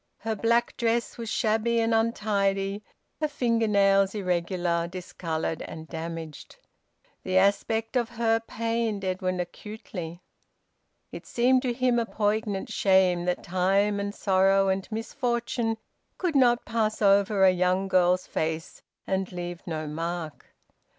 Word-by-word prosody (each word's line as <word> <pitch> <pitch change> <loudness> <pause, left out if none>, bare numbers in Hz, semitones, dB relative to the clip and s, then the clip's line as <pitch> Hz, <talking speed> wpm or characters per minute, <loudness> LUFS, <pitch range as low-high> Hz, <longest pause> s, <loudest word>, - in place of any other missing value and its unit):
Her 220 +1 -3
black 235 +3 +1
dress 235 0 0
was 230 -1 -4
shabby 225 +1 +1
and 225 0 +1
untidy, 205 -3 0 0.4
her 305 - +1
finger 235 -6 0
nails 195 -1 +3
irregular, 175 -2 -1
discoloured, 170 -3 -4
and 160 0 -8
damaged. 165 -1 -7 0.7
The 185 0 0
aspect 220 +4 +1
of 240 -2 +1
her 225 -1 +2
pained 225 -2 -2
Edwin 185 0 -1
acutely. 180 -2 -7 0.9
It - - -9
seemed 255 +2 +3
to 255 -2 -1
him 245 0 +2
a 230 - -1
poignant 210 -2 -1
shame 185 -3 +3
that 180 0 -1
time 195 +3 +1
and 200 0 -3
sorrow 195 0 +3
and 190 +3 -2
misfortune 230 0 -2 0.4
could 350 -5 -1
not 245 -3 +4
pass 220 -2 -1
over 200 0 +4
a 190 - +7
young 185 +1 +1
girl's 185 -1 +3
face 160 0 -3 0.2
and 190 0 -1
leave 175 -1 -5
no 155 -2 -3
mark. 165 +1 -5
195 Hz, 130 wpm, -27 LUFS, 180-225 Hz, 0.9 s, a